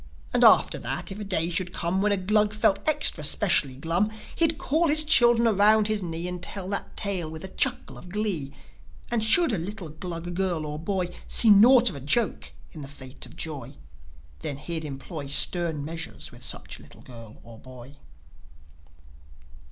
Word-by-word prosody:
And, - - +2
after - - +5
that, - - -5
if 195 - -8
a - - -5
day 180 -5 -2
should 180 +1 -2
come 180 +2 -2
When 210 +1 +1
a 200 - +1
Glug 210 +2 +1
felt 200 -2 +2
extra 295 - +4
specially 150 -4 +3
glum, 165 +9 -1 0.3
He'd 325 -2 +3
call 320 +5 0
his 310 +1 +5
children 240 -5 +5
around 210 0 +3
his 215 -1 0
knee, 170 -1 -5
And 180 -1 -6
tell 190 0 -5
that 200 - -4
tale 190 -6 -3
with 160 +1 -9
a - - -4
chuckle 255 +5 -2
of 180 - -14
glee. 190 -8 -3 0.6
And 235 -2 0
should 295 +6 +2
a 195 - -1
little 185 0 -7
Glug 170 +2 -7
girl 175 -4 -2
or 150 0 -6
boy 180 0 -3
See 225 - +6
naught 235 +3 +6
of - - -10
a - - -7
joke 210 - -1 0.2
in 155 - -11
the 140 - -8
fate 130 -1 -11
of - - -16
Joi, 140 -4 -7 0.6
Then 135 - -6
he'd 160 +2 -6
employ 140 +1 -8
Stern 160 +1 +2
measures 165 +1 -7
with - - -15
such - - -6
little - - -17
girl 115 -3 -13
or 115 -1 -14
boy. 130 +2 -14
180 Hz, 185 wpm, -25 LUFS, 155-210 Hz, 0.6 s, See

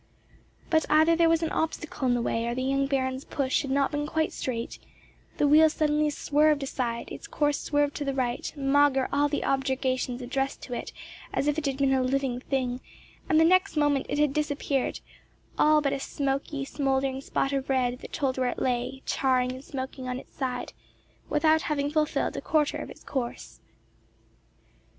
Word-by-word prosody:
But 320 -1 +3
either 315 +2 +5
there 335 0 +4
was 330 0 +2
an 320 - -1
obstacle 320 -4 -2
in 245 - +3
the 240 - -1
way, 230 0 -1
or 235 - -1
the 255 - -2
young 275 +1 +1
Baron's 260 -1 -1
push 265 -2 0
had 275 - -5
not 275 0 +2
been 295 0 -2
quite 315 +1 0
straight: 235 -3 -4 0.6
the 290 - +3
wheel 310 +2 +7
suddenly 300 -1 +1
swerved 295 0 +2
aside, 240 -3 -3
its - - -8
course 295 -1 0
swerved 290 -1 +1
to 295 - -2
the 275 -1 -2
right, 245 -2 -1
maugre 275 -1 +3
all 290 +1 +3
the 290 - -2
objurgations 260 -2 0
addressed 270 +2 -2
to 245 - -6
it - - -4 0.4
as - - -1
if 295 +1 +1
it 300 - -3
had 270 -1 -1
been 275 -1 +2
a 265 - +3
living 255 -1 0
thing, 255 -2 -2 0.5
and 315 - +5
the 325 - +6
next 370 0 +3
moment 290 -2 +2
it - - -1
had 295 -2 +2
disappeared, 285 -2 -1 0.6
all 305 0 +5
but 280 -1 0
a 275 - -2
smoky, 275 0 -2
smouldering 270 -1 -1
spot 275 0 -1
of 275 0 -2
red, 250 -2 +1
that - - -10
told 265 -3 -1
where 255 -1 +2
it - - -4
lay, 255 +1 -2
charring 255 -1 +1
and 260 +1 -8
smoking 260 -2 -6
on 250 - -2
its - - -12
side, 250 -2 -3 0.6
without 315 +1 +3
having 290 -2 -1
fulfilled 305 0 0
a - - -3
quarter 305 -2 +1
of - - -6
its - - -13
course. 245 -3 -5
275 Hz, 190 wpm, -27 LUFS, 260-295 Hz, 0.6 s, wheel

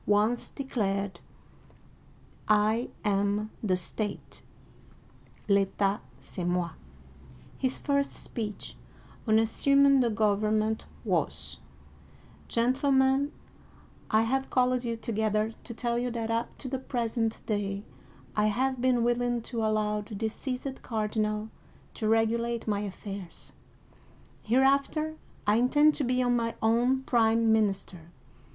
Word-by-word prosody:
once 210 +4 +2
declared, 200 -7 -2 0.7
" - - -28
I 215 +3 +3 0.2
am 205 +1 +1
the 190 -4 +1
state" 205 +3 -5 1.1
("ZV/^/ 200 0 +2 0.2
c'est 180 - -7
moV'\ 175 -1 0 0.9
His 260 -1 0
first 280 -1 0
speech 215 -4 -6 0.5
on 220 0 +5
assuming 275 +5 +4
the 245 -2 +3
government 215 0 +1 0.2
was: - - -1 0.4
" - - -25
Gentlemen, 265 +3 +3 0.8
I 220 +1 +4
have 265 +4 0
called 250 -1 +2
you 230 -1 -2
together 220 -1 0
to 235 - -6
tell 235 0 -1
you 250 +1 -1
that 230 -1 -3
up 230 +1 -2
to 270 - -7
the 260 0 -2
present 230 -3 -2
day 200 -2 -2 0.5
I 210 0 +3
have 255 +4 0
been 250 -2 +3
willing 240 0 +1
to 230 -2 -3
allow 215 -1 +1
the 210 +1 -9
de 220 +2 -1
ceased 260 +3 -5
cardinal 215 -1 -1 0.4
to 220 - -2
regulate 230 +1 +1
my 205 -2 +1
affairs. 200 -2 -7 0.9
Hereafter 275 +6 +2 0.3
I 210 +1 +4
in 245 +2 +3
tend 300 +2 +5
to 295 - -1
be 250 0 +1
my 240 -2 +1
own 245 +4 +2
prime 225 -2 +3
minister. 195 -6 -1
225 Hz, 120 wpm, -29 LUFS, 210-250 Hz, 1.1 s, on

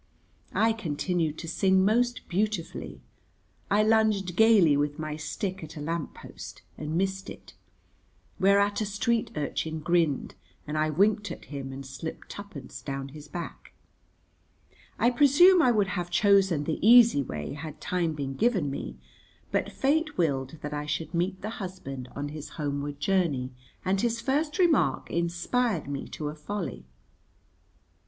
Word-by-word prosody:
I 225 0 +4
continued 165 -4 -1
to 165 - -7
sing 190 +2 +3
most 240 +4 +1
beautifully. 200 -1 -2 0.7
I 210 +1 +4
lunged 215 -5 +2
gayly 205 -8 +6
with 145 +1 0
my 155 -1 -4
stick 185 +4 -4
at 155 0 -9
a - - -5
lamp 160 +1 -3
post - - -10
and 155 +1 -4
missed 190 +1 -1
it, - - -11 0.9
whereat 200 +2 +3
a - - +1
street 220 +3 0
urchin 155 +1 -2
grinned, 160 -3 +1 0.3
and 150 - -4
I 155 0 +1
winked 205 +6 +2
at - - -8
him 135 -1 -5
and 135 +1 -7
slipped 135 +5 -7
twopence 200 -10 -9
down 135 -1 -5
his 150 +1 -11
back. 170 +3 -7 1.2
I 240 - +3
presume 300 +8 +6
I 255 - +5
would 205 -4 +2
have 175 -1 -3
chosen 190 -4 +4
the 155 +1 -2
easy 230 -6 +7
way 75 - -5
had 155 +1 -8
time 170 +1 -1
been 140 -2 -4
given 190 - +1
me, 65 - -6 0.5
but - - 0
fate 300 +3 0
willed 140 -3 0
that 150 0 -4
I 150 0 -3
should 155 +1 -3
meet 180 +2 -1
the 215 - -2
husband 135 -9 -6
on 145 +1 -3
his 150 0 -7
homeward 145 -1 -3
journey, 145 -7 +1 0.3
and 190 +1 +1
his 235 -1 0
first 295 +5 0
remark 320 - +2
inspired 170 - 0
me 140 -1 -4
to 150 -1 -5
a - - -5
folly. 175 - -5
175 Hz, 150 wpm, -28 LUFS, 150-210 Hz, 1.2 s, easy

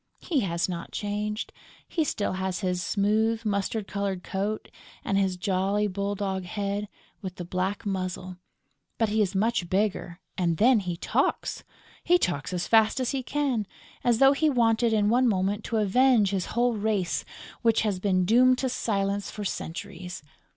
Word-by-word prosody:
He 310 -6 -1
has 170 -6 0
not 175 -2 -5
changed: 210 +1 -3 0.3
he 325 - 0
still 210 -10 -1
has 190 0 -2
his 180 -2 -1
smooth, 220 +3 +1
mustard 200 0 -1
coloured 200 -2 -3
coat 205 +2 -3 0.4
and 195 - 0
his 190 -2 +1
jolly 195 +2 0
bull 200 0 -2
dog 190 -2 -2
head, 200 +2 -3 0.3
with 185 -3 -6
the 175 - -6
black 185 +4 -2
muzzle, 185 -2 -3 0.6
but 225 -2 +1
he 215 +1 +2
is 200 -1 0
much 200 -3 +1
bigger 190 -2 -1 0.2
and 170 -3 +1
then 240 +3 +5
he 180 -3 -4
talks! - - -1 0.4
He 355 +1 +5
talks 175 - -1
as 180 -1 -2
fast 220 +2 +4
as 255 -2 0
he 270 -2 -1
can, 255 -6 -1 0.4
as 240 -2 +3
though 270 +2 +7
he 310 +2 +2
wanted 235 -3 +3
in 210 -2 +2
one 245 +4 +4
moment 200 0 0
to 230 - -1
avenge 215 0 +4
his 190 -2 -1
whole 240 0 +3
race, 210 -4 0 0.4
which 230 -2 +3
has 205 -4 0
been 185 -2 +2
doomed 255 +5 +5
to 260 0 -1
silence 200 -4 -1
for 210 - -6
centuries. 180 -1 -5
205 Hz, 170 wpm, -27 LUFS, 185-225 Hz, 0.6 s, though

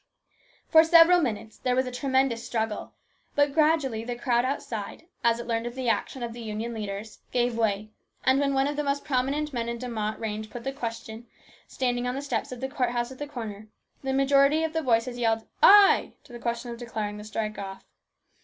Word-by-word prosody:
For 320 0 +7
several 335 +1 +7
minutes 220 -5 -3
there 250 -1 0
was 260 +1 +2
a 250 - -5
tremendous 260 -2 +1
struggle, 220 -2 -3 0.4
but 285 -1 +3
gradually 300 -7 +2
the 245 +1 -4
crowd 240 0 +1
outside, 235 -4 -4 0.2
as 235 0 +3
it 235 - -5
learned 230 0 -1
of 240 - -7
the 260 -2 -1
action 245 +2 -1
of 235 -1 -4
the 240 - -8
Union 220 +1 -4
leaders, 210 0 -6
gave 245 -1 +1
way, 215 -2 0 0.3
and 260 +1 +4
when 275 -1 +1
one 270 0 +3
of 290 +1 -1
the 295 - 0
most 280 0 -1
prominent 285 +2 -1
men 235 -1 -2
in 235 - -2
the - - -12
De 250 - -4
Mott 215 -2 -3
range 215 -1 -4
put 240 0 -8
the 270 - -3
question, 230 -2 -6 0.4
standing 245 -1 -1
on 250 - -2
the 275 - -4
steps 250 -5 -2
of 250 -1 -7
the 265 - -1
court 265 -3 -1
house 240 +1 -2
at 260 - -11
the 290 - -4
corner, 220 -6 -7 0.3
the 270 - -2
majority 275 +3 +4
of 320 0 -2
the 320 - 0
voices 245 -2 +1
yelled 225 -1 +1
" - - -41 0.2
Ay! - - +1
" - - -43
to 250 - -16
the 240 - -7
question 235 0 -3
declaring 220 -3 -4
the 210 - -8
strike 215 0 -4
off. 195 -1 -7
240 Hz, 220 wpm, -27 LUFS, 225-270 Hz, 0.4 s, For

